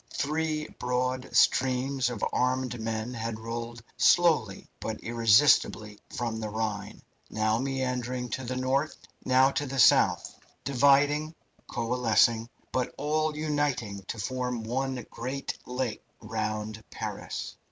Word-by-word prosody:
Three 155 +1 -1
broad 125 +1 -1
streams 130 0 +3
of 120 -4 -2
armed 125 -1 0
men 110 +2 -3
had 115 -1 -4
rolled 115 +1 -6
slowly 160 - +3
but - - -4
irresistibly 115 -2 +3
from 115 -2 -3
the 110 -1 -4
Rhine, 105 -1 -4 0.3
now 110 +1 +1
meandering 125 -2 -2
to 130 - -3
the 130 +1 -3
north, 135 +4 0 0.3
now 130 +1 +4
to 145 +1 -2
the 135 +1 -5
south, 125 - +4 0.2
dividing, 145 +3 +3 0.3
coalescing, 115 -1 +2 0.2
but 130 -1 -1
all 155 +1 0
uniting 145 -9 -1
to - - -4
form 125 +1 -3
one 130 +1 -2
great 130 +3 -4
lake 125 -2 -3 0.2
round 110 0 -4
Paris. - - -5
125 Hz, 120 wpm, -28 LUFS, 115-135 Hz, 0.3 s, now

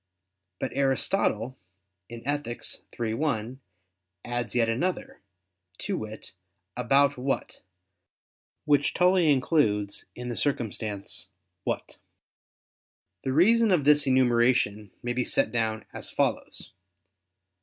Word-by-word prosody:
But - - -2
Aristotle 135 - +1 0.5
in 115 +2 -9
Ethic. 145 -5 -2 0.4
iii, 115 -2 -1
1 125 -2 -2 0.7
adds 120 -1 -3
yet 115 -2 +3
another, 155 +12 -2 0.6
to - - -3
wit, 110 0 -7 0.4
"about 135 +3 +3
what," 135 +2 -3 1.0
which 145 -1 +2
Tully 180 -3 +4
includes 110 -8 +1
in 125 0 -6
the 120 - -3
circumstance 110 -8 -2 0.4
"what." - - -3 1.3
The 130 - -1
reason 220 - +5
of 180 -7 +3
this 150 -1 +6
enumeration 120 -5 +3
may 120 0 -1
be 125 +1 0
set - - +1
down 110 -2 -1
as - - -6
follows. - - -2
125 Hz, 105 wpm, -27 LUFS, 115-145 Hz, 1.3 s, this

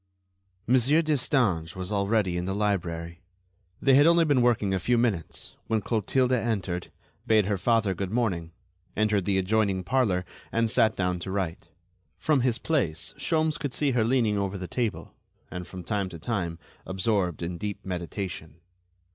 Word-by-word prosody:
Monsieur 130 +7 +4
Destange 120 - +1
was 95 +1 -4
already 100 -2 +1
in 90 0 -2
the 95 +1 -2
library. 85 -5 -2 0.6
They 135 - +4
had 145 +3 +7 0.2
been 140 -4 +3
working 120 -4 +2
only 95 - +1
a - - -3
few 120 +7 +1
minutes, 110 -9 -2
when 110 -1 +1
Clotilde 125 +4 +1
entered, 105 -7 -1 0.4
bade 110 -2 +4
her 100 -1 -1
father 110 -2 +2
good 95 +1 -4
morning, 95 -8 -1 0.5
entered 105 -3 +2
the 100 -2 +1
adjoining 95 -1 +1
parlor 100 -6 +1 0.3
and 115 -1 +1
sat 110 -1 +3
down 90 -1 -1
to 85 - -6
write. 95 -4 -3 0.5
From 135 - +2
his 120 -2 +1
place 105 - -1
Sholmes 155 -2 +1
could 145 -5 -4
see 145 -2 +1
her 120 -3 +2
leaning 115 -3 +2
over 100 0 -2
the 90 -1 -6
table 115 -1 -3 0.4
and 90 -1 -6
from 90 -1 -8
time 100 +1 -1
to 85 - -8
time 85 -3 -3 0.3
absorbed 95 -3 -1
in 85 0 -4
deep 105 +1 -5
meditation. 85 -3 -5
100 Hz, 165 wpm, -27 LUFS, 90-120 Hz, 0.6 s, had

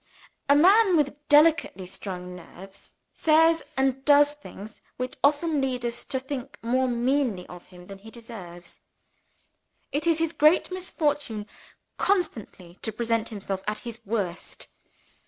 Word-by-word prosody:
A 285 - +7
man 375 +4 +5
with 285 -2 +1
delicately 295 - +4
strung 180 -1 -7
nerves 190 +2 -13 0.2
says 325 +1 +4 0.2
and 265 0 +1
does 290 0 +5
things 220 -7 -12 0.2
which 255 0 -4
often 295 +1 +2
lead 255 -2 -2
us 235 0 -3
to 260 - -2
think 265 0 -7
more 255 +3 +1
meanly 240 -5 0
of 175 0 -12
him 180 -1 -14
than 195 +1 -11
he 220 +3 -13
deserves. 205 -7 -11 1.1
It 300 +4 -1
is 330 -2 +3
his 325 0 -1
great 305 +5 +4
misfortune 295 - -2 0.5
constantly 225 - -2
to 220 - -1
present 230 0 -1
himself 195 -3 -5
at 210 - -1
his 235 -1 -7
worst. 195 -5 -4
250 Hz, 140 wpm, -26 LUFS, 200-295 Hz, 1.1 s, A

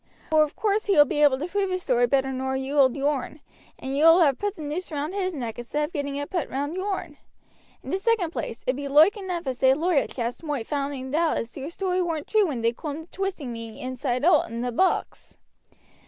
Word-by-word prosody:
Vor 310 -1 +5
of 305 -1 0
course 425 0 0
he 395 - +3
will 295 - +8
be 295 - -1
able 285 -3 +5
to 290 - -3
prove 390 +2 -1
his 370 0 -2
story 245 -1 +2
better 270 +1 +1
nor 265 0 -2
you 265 +1 -3
will 275 -2 +4
yourn, 285 +1 -1 0.4
and 265 +1 -5
you 290 - +1
will 330 +2 +8
have 280 -5 +3
put 410 0 -2
the 315 - -8
noose 320 +5 -4
round 300 +3 -3
his 380 -2 -1
neck 240 -4 -5
instead 295 +5 -2
of 320 - -11
getting 285 -3 -3
it 285 0 -4
put 350 -6 -2
round 285 +5 -3
yourn. 370 -5 -3 0.7
In - - -6
the 380 - 0
second 400 -6 +1
place, 235 -8 -5
it 255 - +1
be 285 +1 -5
loike 305 +9 +6
enough 365 -5 -4
as 255 -2 -3
they 265 0 +5
lawyer 320 -1 +1
chaps 240 -1 -4
moight 295 -8 -3
find 275 -2 -3
out 330 +1 +2
as 230 - -5
your 275 +1 -5
story 370 +1 -1
weren't 325 -4 -2
true 430 -3 +3
when 260 -7 -3
they 230 +1 +2
coom 300 +4 -6
to 335 - -22
twisting 375 -10 -4
me 230 -1 -8
inside 255 +1 -2
owt 360 - +4
in 230 +1 -4
the 245 0 -2
box. 370 +10 -1
295 Hz, 240 wpm, -25 LUFS, 265-355 Hz, 0.7 s, will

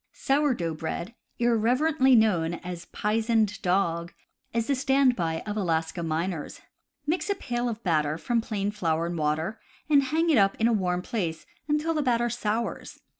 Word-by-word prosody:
Sour 285 -1 +1
dough 165 -4 -2
Bread, 170 +6 -5 0.2
irreverently 255 +4 +3
known 175 -7 +3
as 175 -1 -7
"pizened 220 0 0
dog," 170 -2 0 0.4
is 230 -1 0
the 280 - +1
stand 265 -1 +3
by 165 -4 -2
of 210 -1 -5
Alaska 165 -4 -1
miners. 165 0 -3 0.5
Mix 335 +7 -1
a 400 - +2
pail 245 -7 -2
of 230 0 -6
batter 155 -3 +1
from 235 +6 0
plain 205 -3 -2
flour 165 -5 0
and 170 0 -3
water, 160 +7 -1 0.3
and 285 -1 +7
hang 325 +5 +1
it 270 - +5
up 195 0 +3
in 225 - +3
a 235 - +2
warm 180 -3 0
place 175 -9 -3 0.2
until 300 +2 +1
the 310 - 0
batter 240 -3 +1
sours. 230 0 -3
215 Hz, 170 wpm, -27 LUFS, 170-245 Hz, 0.5 s, and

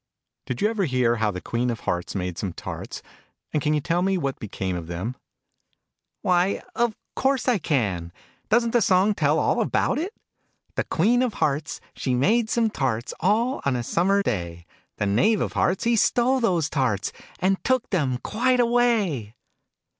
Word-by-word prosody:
Did 125 +6 -3
you - - +5
ever 205 -4 0
hear 125 -4 +2
how 110 -1 +1
the 90 -3 -4
Queen 120 +1 -1
of 115 - -3
Hearts 90 +2 -2
made 90 -2 -2
some 95 -4 -3
tarts? - - -7 0.5
And 150 - +1
can 150 +1 +1
you 150 - 0
tell 170 +4 0
me 190 +1 +1
what 140 -5 -2
became 95 -4 -4
of 85 -2 -5
them? 90 +9 -4 0.7
" - - -58
Why, 180 +1 +2
of 235 -2 +1 0.2
course 265 -2 +1
I 240 -5 +3
can! 100 - -1 0.4
Doesn't 235 +1 +3
the 240 - +3
song 190 +2 +4
tell - - +2
all - - +2
about - - +1
it? 375 +8 -4 0.6
The - - -1
Queen 225 +9 +2
of 250 -5 0
Hearts, 150 +1 -1 0.2
she 130 -2 -1
made 220 - +2
some 230 -2 +1
tarts: 120 - -2
All 225 +8 +1
on 140 -2 +1
a 120 - -2
summer 195 +9 +2
day: 85 - -3 0.3
The 105 - 0
Knave 190 - +3
of - - -2
Hearts, 180 +1 +1
he 235 0 +3
stole 245 +4 +3
those 180 - +1
tarts, 130 -10 0 0.3
And 190 +1 0
took 255 -1 +1
them 140 -10 +1
quite 250 +3 +1
away 225 - +1
170 Hz, 180 wpm, -24 LUFS, -, 0.7 s, you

